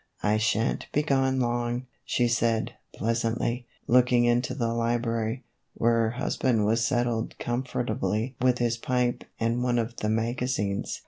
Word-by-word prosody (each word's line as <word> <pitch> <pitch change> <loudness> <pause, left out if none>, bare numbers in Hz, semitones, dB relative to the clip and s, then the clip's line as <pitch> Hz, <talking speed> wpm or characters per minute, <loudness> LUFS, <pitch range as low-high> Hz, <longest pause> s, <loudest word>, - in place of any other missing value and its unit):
" - - -27
I 110 - +3
sha' 110 0 +2
n 115 - +1
't - - -10
be 150 - +2
gone 135 -2 +2
long," 120 0 -1 0.2
she 120 - +1
said, 115 -1 +1 0.2
pleasantly, 115 +2 -1 0.2
looking 125 0 +4
into 120 +1 +1
the 115 -4 -1
library, 115 +1 -1 0.3
where 115 +1 +2
her 115 -1 +2
husband 120 -2 0
was 115 +2 +2
settled 120 -1 0
comfortably 120 -1 -2
with 125 -1 +3
his 120 -1 0
pipe 125 0 0 0.2
and 115 +2 0
one 125 -1 +1
of 115 0 -2
the 105 - -1
magazines. 115 -2 -1
120 Hz, 155 wpm, -27 LUFS, 115-125 Hz, 0.3 s, looking